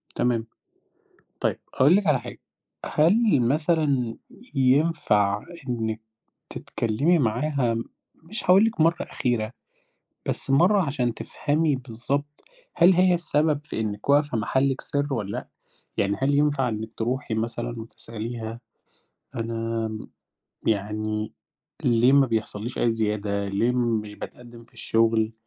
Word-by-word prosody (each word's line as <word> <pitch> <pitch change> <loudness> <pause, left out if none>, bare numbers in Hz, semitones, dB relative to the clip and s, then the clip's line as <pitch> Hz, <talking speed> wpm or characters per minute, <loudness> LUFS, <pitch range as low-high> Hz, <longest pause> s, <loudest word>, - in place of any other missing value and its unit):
تمام. 120 -2 +1 0.9
طيب، - - 0 0.2
هأقول 145 +7 +6
لِك 200 -2 +1
على 145 -4 +4
حاجة. - - -9 0.5
هل 180 - +3
مثلًا 140 -3 +1 0.4
ينفع 130 -7 +2 0.2
إنِّك 110 -2 -2 0.5
تتكلّمي 140 +10 0
معاها 125 0 +1 0.5
مش 195 +8 -5
هاقول 190 +4 +6
لِك 225 -7 -1
مرّة 165 +2 +3
أخيرة، 120 -3 -1 0.8
بس - - -2
مرّة 185 +9 +5
عشان 130 -6 -1
تفهمي 150 +2 0
بالضبط 135 +4 -4 0.3
هل 175 +2 +6
هي 180 0 +4
السبب 155 -3 +1
في 150 - -4
إنِّك 105 0 -4
واقفة 145 -3 +3
محلِك 130 +5 +1
سر 145 0 -1
والّا 105 -5 -3
لأ؟ - - -5 0.5
يعني 100 0 +1
هل 140 +2 +2
ينفع 145 -3 +2
إنِّك 110 -1 -4
تروحي 120 +1 -2
مثلًا 120 +1 -3
وتسأليها، 115 0 -6 0.8
أنا 115 -1 -2 0.8
يعني 105 +1 -1 0.5
ليه 120 +2 +4
ما 140 -1 +6
بيحصلّيش 115 0 -3
أي 120 - +3
زيادة، 105 -2 -1
ليه 105 +5 +1
مش 115 -4 -1
باتقدّم 120 +1 -10
في 115 - -24
الشغل؟ 115 -1 +2
120 Hz, 120 wpm, -25 LUFS, 110-145 Hz, 0.9 s, هأقول